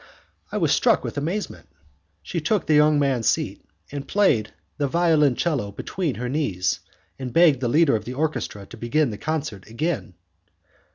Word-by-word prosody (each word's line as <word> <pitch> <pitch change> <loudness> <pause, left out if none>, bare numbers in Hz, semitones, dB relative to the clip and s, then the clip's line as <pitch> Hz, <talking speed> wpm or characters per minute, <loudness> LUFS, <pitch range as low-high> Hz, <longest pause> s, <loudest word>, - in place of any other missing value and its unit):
I - - -2
was - - +2
struck - - +3
with - - -5
amazement. 170 +9 -3 0.6
She - - -3
took 215 -6 0
the 155 - +2
young 150 0 +5
man's 135 -6 +1
seat, - - -1 0.4
placed 135 - +2 0.3
the 145 - +1
violoncello 150 -7 +2
between 165 - -3
her 125 +1 -4
knees, 120 - -1 0.4
and 130 -2 -5
begged 155 -1 +5
the 125 - -1
leader 150 0 +4
of 110 - -3
the 125 - -5
orchestra 145 -9 -2
to - - -12
begin 135 +3 +1
the 105 - -7
concerto 145 -11 -4
again. 115 - -3
145 Hz, 160 wpm, -23 LUFS, 120-160 Hz, 0.6 s, young